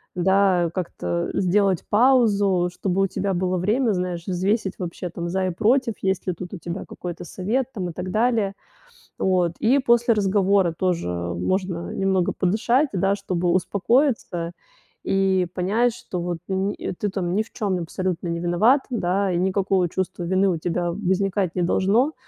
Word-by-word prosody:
да, 185 Hz, -1 st, +3 dB
как-то 90 Hz, -, -3 dB
сделать 190 Hz, -1 st, +1 dB
паузу, 205 Hz, -6 st, +3 dB
чтобы 190 Hz, +1 st, -1 dB
у -, -, +2 dB
тебя 195 Hz, +1 st, -2 dB
было 185 Hz, +1 st, 0 dB
время, 215 Hz, +6 st, +1 dB
знаешь, 180 Hz, -2 st, -3 dB
взвесить 190 Hz, +2 st, 0 dB
вообще 175 Hz, 0 st, -5 dB
там 170 Hz, 0 st, -5 dB
за 190 Hz, +1 st, 0 dB
и -, -, -1 dB
против, 230 Hz, +6 st, +2 dB
есть 190 Hz, -1 st, -1 dB
ли 185 Hz, -, +1 dB
тут 175 Hz, +2 st, -8 dB
у -, -, -4 dB
тебя 170 Hz, +2 st, -5 dB
какой-то 175 Hz, -1 st, -7 dB
совет 230 Hz, +10 st, -2 dB
там 185 Hz, -5 st, -3 dB
и -, -, -7 dB
так 180 Hz, +2 st, -5 dB
далее. 220 Hz, -2 st, +1 dB, 0.7 s
Вот. 180 Hz, -3 st, +2 dB
И 245 Hz, +5 st, +3 dB
после 235 Hz, -2 st, +3 dB
разговора 195 Hz, -3 st, +2 dB
тоже 180 Hz, -, 0 dB
можно 165 Hz, -, -2 dB
немного 190 Hz, -2 st, +1 dB
подышать, 235 Hz, +10 st, +1 dB
да, 195 Hz, +1 st, +2 dB
чтобы 180 Hz, -3 st, -2 dB
успокоиться 190 Hz, -, +1 dB, 0.5 s
и 190 Hz, -1 st, +2 dB
понять, 220 Hz, +7 st, +1 dB
что 190 Hz, -6 st, -6 dB
вот 175 Hz, 0 st, -3 dB
ни 195 Hz, +1 st, -1 dB, 0.3 s
ты 210 Hz, -, 0 dB
там 185 Hz, -2 st, -2 dB
ни 215 Hz, -, +2 dB
в 220 Hz, -, -21 dB
чём 195 Hz, -5 st, -1 dB
абсолютно 180 Hz, +1 st, -3 dB
не 170 Hz, 0 st, -2 dB
виноват, 180 Hz, +11 st, +3 dB
да, 195 Hz, -4 st, 0 dB
и 175 Hz, -, 0 dB
никакого 190 Hz, 0 st, +1 dB
чувства 185 Hz, 0 st, -3 dB
вины 190 Hz, +3 st, +2 dB
у 175 Hz, -, 0 dB
тебя 175 Hz, +1 st, -1 dB
возникать 195 Hz, -1 st, 0 dB
не 180 Hz, -, 0 dB
должно, 215 Hz, -, +2 dB
190 Hz, 165 wpm, -23 LUFS, 175-205 Hz, 0.7 s, да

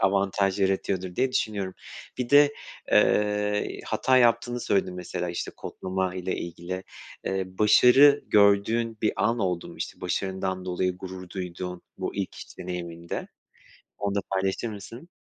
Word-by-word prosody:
avantaj 100 Hz, 0 st, +2 dB
yaratıyordur 95 Hz, -1 st, 0 dB
diye 130 Hz, 0 st, +1 dB
düşünüyorum. 100 Hz, -6 st, -1 dB, 0.4 s
Bir 125 Hz, 0 st, -2 dB
de, 145 Hz, 0 st, +7 dB, 0.4 s
eee, 105 Hz, 0 st, +2 dB
hata 130 Hz, -, +2 dB
yaptığını 120 Hz, 0 st, +3 dB
söyledin 95 Hz, -4 st, 0 dB
mesela, 90 Hz, 0 st, -4 dB
işte, 85 Hz, -, -4 dB
kodlama 95 Hz, -1 st, -3 dB
ile 95 Hz, 0 st, -2 dB
ilgili. 85 Hz, +2 st, -5 dB, 0.4 s
Eee, 95 Hz, 0 st, -1 dB
başarı 130 Hz, +7 st, +6 dB
gördüğün 105 Hz, +3 st, +3 dB
bir 110 Hz, -, +3 dB
an 115 Hz, +2 st, +1 dB
oldu 90 Hz, -5 st, -1 dB
mu, -, -, -11 dB
işte, -, -, -6 dB
başarından 95 Hz, 0 st, -2 dB
dolayı 90 Hz, 0 st, -1 dB
gurur 95 Hz, 0 st, -8 dB
duyduğun 90 Hz, -1 st, -5 dB, 0.2 s
bu -, -, -3 dB
ilk 100 Hz, -2 st, -3 dB
iş -, -, -11 dB
deneyiminde 85 Hz, -2 st, -5 dB, 0.7 s
onu 100 Hz, -1 st, -1 dB
da 100 Hz, -, +1 dB
paylaşır 95 Hz, +4 st, 0 dB
mısın? 115 Hz, -, -9 dB
95 Hz, 140 wpm, -26 LUFS, 90-105 Hz, 0.7 s, de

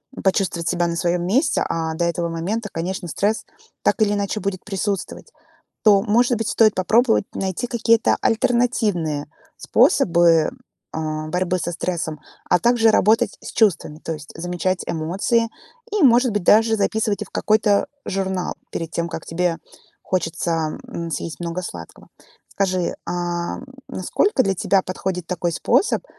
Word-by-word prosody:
м, -, -, -8 dB
почувствовать 185 Hz, -3 st, 0 dB
себя 175 Hz, -1 st, +1 dB
на 170 Hz, -, -2 dB
своем 175 Hz, +1 st, 0 dB
месте. 265 Hz, -, +2 dB
А 160 Hz, -1 st, -2 dB
до 170 Hz, +1 st, 0 dB
этого 170 Hz, 0 st, -1 dB
момента, 200 Hz, +7 st, -3 dB
конечно, 180 Hz, +2 st, -4 dB
стресс 205 Hz, +6 st, 0 dB, 0.4 s
так -, -, +2 dB
или 205 Hz, -1 st, +3 dB
иначе 205 Hz, +1 st, -1 dB
будет 195 Hz, -1 st, -3 dB
присутствовать. 200 Hz, -1 st, -4 dB, 0.5 s
То, 200 Hz, -3 st, +6 dB
может 235 Hz, +3 st, +3 dB
быть, 225 Hz, 0 st, -2 dB
стоит 215 Hz, -2 st, +4 dB
попробовать 225 Hz, +5 st, +3 dB
найти 190 Hz, +4 st, -2 dB
какие-то 230 Hz, -1 st, +2 dB
альтернативные 215 Hz, -11 st, +1 dB, 0.3 s
способы, 170 Hz, -1 st, +4 dB, 0.4 s
а, 155 Hz, -1 st, -3 dB
борьбы 180 Hz, +2 st, 0 dB
со 175 Hz, -, -3 dB
стрессом, 165 Hz, -3 st, -3 dB, 0.3 s
а -, -, +4 dB
также 235 Hz, -2 st, +4 dB
работать 215 Hz, +2 st, +3 dB
с -, -, -8 dB
чувствами, 195 Hz, -8 st, +1 dB
то 165 Hz, -, -4 dB
есть 150 Hz, -1 st, -10 dB
замечать 180 Hz, +2 st, -2 dB
эмоции 195 Hz, +8 st, 0 dB, 0.4 s
и, 415 Hz, -4 st, +1 dB
может 245 Hz, -1 st, +5 dB
быть, 205 Hz, -3 st, -1 dB
даже 225 Hz, +4 st, +5 dB
записывать 215 Hz, 0 st, 0 dB
их -, -, -16 dB
в -, -, -48 dB
какой-то 210 Hz, -1 st, +2 dB, 0.2 s
журнал 190 Hz, -1 st, -2 dB, 0.2 s
перед 165 Hz, -1 st, -4 dB
тем, 170 Hz, +1 st, -2 dB
как 160 Hz, -, -6 dB
тебе 170 Hz, 0 st, -1 dB, 0.5 s
хочется, 165 Hz, -3 st, -1 dB
м, 170 Hz, 0 st, -5 dB
съесть 160 Hz, +1 st, -4 dB
много 170 Hz, +1 st, -3 dB
сладкого. 85 Hz, -, -9 dB, 0.4 s
Скажи, 185 Hz, -3 st, -1 dB
ам, 175 Hz, 0 st, -3 dB, 0.2 s
насколько 400 Hz, -11 st, +1 dB
для 195 Hz, -, +1 dB
тебя 195 Hz, +2 st, +2 dB
подходит 185 Hz, -1 st, -4 dB
такой 175 Hz, -1 st, -2 dB
способ, 400 Hz, -, +1 dB
185 Hz, 150 wpm, -21 LUFS, 170-215 Hz, 0.5 s, То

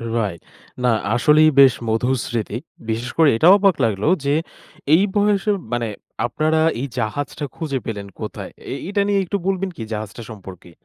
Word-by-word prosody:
Right. 100 Hz, -7 st, -2 dB, 0.4 s
না 125 Hz, -, +4 dB, 0.2 s
আসলেই 150 Hz, +5 st, +5 dB
বেশ 135 Hz, -3 st, +8 dB
মধুর 125 Hz, +4 st, +1 dB
স্মৃতি। 115 Hz, -1 st, -3 dB, 0.3 s
বিশেষ 115 Hz, +2 st, -2 dB
করে 160 Hz, -3 st, +6 dB
এটা 160 Hz, -, +4 dB
অবাক 195 Hz, -3 st, +3 dB
লাগল 105 Hz, -2 st, -2 dB, 0.2 s
যে, 140 Hz, +1 st, +2 dB, 0.6 s
এই 180 Hz, +5 st, +6 dB
বয়সে 205 Hz, 0 st, +2 dB, 0.2 s
মানে 120 Hz, -1 st, 0 dB, 0.4 s
আপনারা 155 Hz, +6 st, 0 dB, 0.2 s
এই 140 Hz, -, -2 dB
জাহাজটা 140 Hz, +6 st, -3 dB
খুঁজে 150 Hz, -5 st, -3 dB
পেলেন 100 Hz, -3 st, -5 dB
কোথায়? -, -, -6 dB, 0.2 s
এ -, -, -2 dB
এইটা 200 Hz, +1 st, 0 dB
নিয়ে 200 Hz, -1 st, +2 dB
একটু 200 Hz, +3 st, -1 dB
বলবেন 195 Hz, 0 st, 0 dB
কি, 115 Hz, -, -6 dB
জাহাজটা 105 Hz, +1 st, -6 dB
সম্পর্কে? 95 Hz, -5 st, -11 dB
130 Hz, 160 wpm, -21 LUFS, 110-165 Hz, 0.6 s, বেশ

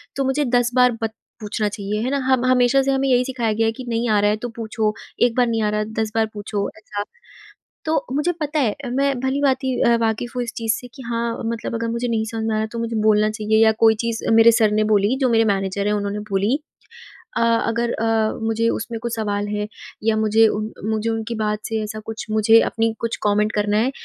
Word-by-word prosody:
तो 275 Hz, -, 0 dB
मुझे 270 Hz, +3 st, +1 dB
10 245 Hz, -1 st, +2 dB
बार 250 Hz, 0 st, +5 dB
बत 220 Hz, -1 st, -2 dB, 0.3 s
पूछना 210 Hz, 0 st, -2 dB
चाहिए 205 Hz, +1 st, -3 dB
है 255 Hz, -, -1 dB
ना? 280 Hz, -, +1 dB
हम 260 Hz, -2 st, +1 dB
हमेशा 255 Hz, +1 st, +4 dB
से 270 Hz, 0 st, 0 dB
हमें 270 Hz, 0 st, +1 dB
यही 250 Hz, 0 st, +4 dB
सिखाया 240 Hz, -4 st, -1 dB
गया 225 Hz, +1 st, +1 dB
है 225 Hz, -, +2 dB
कि 255 Hz, -, -7 dB
नहीं 230 Hz, 0 st, -1 dB
आ 210 Hz, -1 st, +3 dB
रहा 205 Hz, -, +3 dB
है, 210 Hz, -, -1 dB
तो 240 Hz, +3 st, -5 dB
पूछो 220 Hz, -1 st, -2 dB, 0.3 s
एक 240 Hz, -1 st, +2 dB
बार 250 Hz, -1 st, +4 dB
नहीं 225 Hz, -1 st, 0 dB
आ 210 Hz, -, +1 dB
रहा 210 Hz, 0 st, 0 dB, 0.2 s
10 220 Hz, -, -2 dB
बार 225 Hz, -, +3 dB
पूछो 205 Hz, -1 st, -3 dB
ऐसा। 205 Hz, -1 st, -5 dB, 0.8 s
तो 315 Hz, -2 st, 0 dB
मुझे 300 Hz, +5 st, +1 dB
पता 300 Hz, 0 st, -1 dB
है 225 Hz, -7 st, +1 dB, 0.2 s
मैं 275 Hz, -1 st, +1 dB
भली-भाँति 265 Hz, -1 st, 0 dB
अ, 235 Hz, 0 st, +4 dB
वाक़िफ़ 225 Hz, +2 st, -1 dB
हूँ 250 Hz, -, -1 dB
इस 235 Hz, -, -6 dB
चीज 225 Hz, -1 st, 0 dB
से 245 Hz, -, -6 dB
कि 265 Hz, -, -10 dB
हाँ, 235 Hz, 0 st, -2 dB
मतलब 230 Hz, 0 st, -3 dB
अगर 230 Hz, 0 st, -2 dB
मुझे 235 Hz, +1 st, -2 dB
नहीं 225 Hz, -2 st, 0 dB
समझ 225 Hz, -1 st, -3 dB
में 220 Hz, -, 0 dB
आ -, -, 0 dB
रहा, 220 Hz, -, -1 dB
तो 230 Hz, +1 st, -6 dB
मुझे 230 Hz, 0 st, -3 dB
बोलना 215 Hz, 0 st, +4 dB
चाहिए 220 Hz, 0 st, +2 dB
या 220 Hz, -, +6 dB
कोई 220 Hz, -1 st, +6 dB
चीज़ 230 Hz, -1 st, -2 dB
मेरे 225 Hz, +1 st, +7 dB
सर 220 Hz, -2 st, +3 dB
ने 215 Hz, 0 st, +2 dB
बोली 205 Hz, +5 st, +3 dB
जो 255 Hz, -, +3 dB
मेरे 225 Hz, -1 st, +3 dB
मैनेजर 195 Hz, 0 st, 0 dB
हैं 210 Hz, -, +1 dB
उन्होंने 205 Hz, 0 st, -2 dB
बोली 200 Hz, +7 st, +1 dB, 0.8 s
अ, -, -, +1 dB
अगर 230 Hz, 0 st, +1 dB
अ, 225 Hz, -1 st, 0 dB
मुझे 225 Hz, +1 st, +1 dB
उसमें 230 Hz, 0 st, -4 dB
कुछ 235 Hz, -1 st, -2 dB
सवाल 205 Hz, -2 st, -1 dB
है 210 Hz, 0 st, -2 dB, 0.4 s
या 220 Hz, -1 st, +2 dB
मुझे 220 Hz, +1 st, +4 dB
उन 215 Hz, +1 st, -3 dB, 0.2 s
मुझे 220 Hz, +1 st, -1 dB
उनकी 225 Hz, +1 st, -3 dB
बात 210 Hz, 0 st, 0 dB
से 220 Hz, -1 st, -2 dB
ऐसा 215 Hz, 0 st, -6 dB
कुछ 225 Hz, 0 st, -6 dB
मुझे 220 Hz, +1 st, +5 dB
अपनी 225 Hz, 0 st, 0 dB
कुछ 230 Hz, 0 st, -2 dB
कमेंट 210 Hz, +1 st, +2 dB
करना 210 Hz, 0 st, 0 dB
है 245 Hz, +5 st, +2 dB
225 Hz, 235 wpm, -21 LUFS, 215-240 Hz, 0.8 s, मेरे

